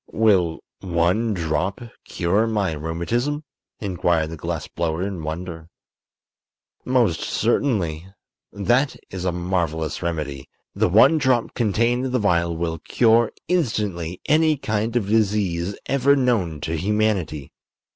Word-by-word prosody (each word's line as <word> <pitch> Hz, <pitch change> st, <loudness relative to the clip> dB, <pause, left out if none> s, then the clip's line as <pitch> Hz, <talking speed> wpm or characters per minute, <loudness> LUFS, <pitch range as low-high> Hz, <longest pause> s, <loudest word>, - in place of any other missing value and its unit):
"Will 95 Hz, -7 st, +2 dB, 0.2 s
one 90 Hz, +6 st, +1 dB
drop 85 Hz, +3 st, -1 dB, 0.3 s
cure 100 Hz, +6 st, +1 dB
my 105 Hz, -5 st, 0 dB
rheumatism?" 85 Hz, -, -2 dB, 0.4 s
inquired 85 Hz, -5 st, 0 dB
the -, -, -5 dB
glass 75 Hz, -, -4 dB
blower, 85 Hz, +1 st, -2 dB
in 95 Hz, -4 st, -4 dB
wonder. 80 Hz, +1 st, -6 dB, 1.1 s
"Most 120 Hz, -10 st, +2 dB
certainly. 95 Hz, -, 0 dB, 0.4 s
That 120 Hz, +7 st, +1 dB, 0.2 s
is 95 Hz, -1 st, -5 dB
a 90 Hz, -, +1 dB
marvelous 85 Hz, -3 st, -2 dB
remedy. 75 Hz, -5 st, -4 dB, 0.2 s
The -, -, +1 dB
one 130 Hz, -, +6 dB
drop 130 Hz, -4 st, +1 dB
contained 120 Hz, +3 st, +1 dB
in -, -, -4 dB
the -, -, +3 dB
vial 85 Hz, -6 st, +1 dB
will 80 Hz, -1 st, -2 dB
cure 115 Hz, +3 st, +3 dB, 0.2 s
instantly 105 Hz, -, -1 dB
any 155 Hz, 0 st, +3 dB
kind 110 Hz, -2 st, -2 dB
of 120 Hz, -5 st, +1 dB
disease 100 Hz, -4 st, +1 dB
ever 140 Hz, +1 st, +3 dB
known 110 Hz, -, 0 dB
to 80 Hz, +1 st, -2 dB
humanity. 100 Hz, -6 st, -1 dB
95 Hz, 125 wpm, -22 LUFS, 85-115 Hz, 1.1 s, one